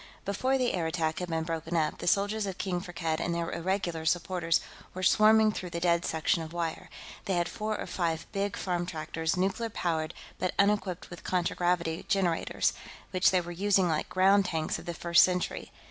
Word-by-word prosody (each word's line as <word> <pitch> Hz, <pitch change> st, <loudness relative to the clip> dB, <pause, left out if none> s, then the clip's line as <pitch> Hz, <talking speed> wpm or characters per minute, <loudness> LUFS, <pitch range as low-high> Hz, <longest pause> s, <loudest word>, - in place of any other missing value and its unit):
Before 255 Hz, +7 st, +1 dB
the 250 Hz, -2 st, +1 dB
air 170 Hz, -3 st, 0 dB
attack 160 Hz, -1 st, -1 dB
had 180 Hz, -1 st, -4 dB
been 160 Hz, -1 st, -1 dB
broken 165 Hz, +1 st, -3 dB
up, 155 Hz, -1 st, 0 dB
the -, -, -5 dB
soldiers 205 Hz, +3 st, +2 dB
of 190 Hz, -1 st, -5 dB
King 180 Hz, -2 st, -2 dB
Firkked 170 Hz, -3 st, -3 dB
and 170 Hz, 0 st, -1 dB
their 170 Hz, 0 st, -2 dB
irregular 175 Hz, -2 st, -2 dB
supporters 165 Hz, +1 st, +1 dB, 0.4 s
were 185 Hz, -, -4 dB
swarming 215 Hz, +3 st, +5 dB
through 185 Hz, -3 st, -5 dB
the 170 Hz, -, -4 dB
dead 170 Hz, 0 st, +2 dB
section 160 Hz, +1 st, +1 dB
of 160 Hz, 0 st, -7 dB
wire. 170 Hz, -2 st, -3 dB, 0.4 s
They 190 Hz, -, 0 dB
had 175 Hz, -1 st, +1 dB
four 215 Hz, +2 st, -3 dB
or -, -, -3 dB
five 165 Hz, -2 st, -2 dB
big 200 Hz, -1 st, -2 dB
farm 175 Hz, -2 st, -2 dB
tractors, 160 Hz, 0 st, -2 dB
nuclear 195 Hz, +5 st, 0 dB
powered 160 Hz, -6 st, -2 dB, 0.2 s
but 185 Hz, -, -1 dB
unequipped 200 Hz, -4 st, +1 dB
with 175 Hz, -, -9 dB
contragravity 175 Hz, -2 st, 0 dB
generators, 180 Hz, -4 st, +1 dB, 0.4 s
which 185 Hz, -1 st, +4 dB
they 185 Hz, -1 st, +2 dB
were 175 Hz, 0 st, -7 dB
using 190 Hz, +1 st, +2 dB
like 155 Hz, -1 st, -1 dB
ground 190 Hz, +2 st, +4 dB
tanks 160 Hz, -3 st, -2 dB
of -, -, -12 dB
the 170 Hz, -, -3 dB
First 170 Hz, 0 st, +5 dB
Century. 180 Hz, -1 st, -1 dB
175 Hz, 190 wpm, -29 LUFS, 165-195 Hz, 0.4 s, swarming